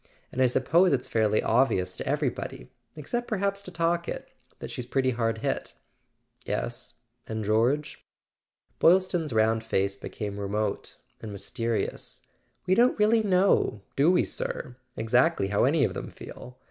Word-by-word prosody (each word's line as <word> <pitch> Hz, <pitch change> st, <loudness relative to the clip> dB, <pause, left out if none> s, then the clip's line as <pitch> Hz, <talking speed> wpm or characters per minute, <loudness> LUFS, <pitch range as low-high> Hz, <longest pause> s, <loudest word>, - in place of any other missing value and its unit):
And 130 Hz, -, -2 dB
I 130 Hz, -, +6 dB
suppose 160 Hz, +9 st, +3 dB
it's 130 Hz, -2 st, -1 dB
fairly 110 Hz, -1 st, +2 dB
obvious 105 Hz, -7 st, +2 dB
to -, -, -6 dB
everybody—except 155 Hz, -, -4 dB
perhaps 200 Hz, -1 st, -1 dB
to 185 Hz, -, -9 dB
Talkett—that 170 Hz, 0 st, -3 dB
she's 120 Hz, -, -5 dB
pretty 130 Hz, 0 st, +1 dB
hard 115 Hz, -2 st, -1 dB
hit." -, -, -2 dB, 0.7 s
"Yes. -, -, -4 dB, 0.3 s
And 110 Hz, -1 st, -3 dB
George?" 125 Hz, +8 st, +1 dB, 0.8 s
Boylston's 175 Hz, -3 st, +3 dB
round 110 Hz, 0 st, +2 dB
face 100 Hz, -3 st, 0 dB
became 100 Hz, 0 st, -6 dB
remote 100 Hz, +1 st, -3 dB, 0.2 s
and 110 Hz, -, -7 dB
mys¬ 100 Hz, -1 st, -7 dB
terious. 115 Hz, -2 st, -3 dB, 0.4 s
"We 185 Hz, -, +3 dB
don't 240 Hz, +5 st, +4 dB
really 220 Hz, +1 st, +4 dB
know—do 180 Hz, -, +2 dB
we, 180 Hz, -, +4 dB
sir?—exactly 125 Hz, -1 st, -1 dB
how 105 Hz, +3 st, +2 dB
any 145 Hz, +2 st, +3 dB
of -, -, +1 dB
them -, -, -6 dB
feel? 125 Hz, +1 st, -11 dB
125 Hz, 135 wpm, -27 LUFS, 110-170 Hz, 0.8 s, I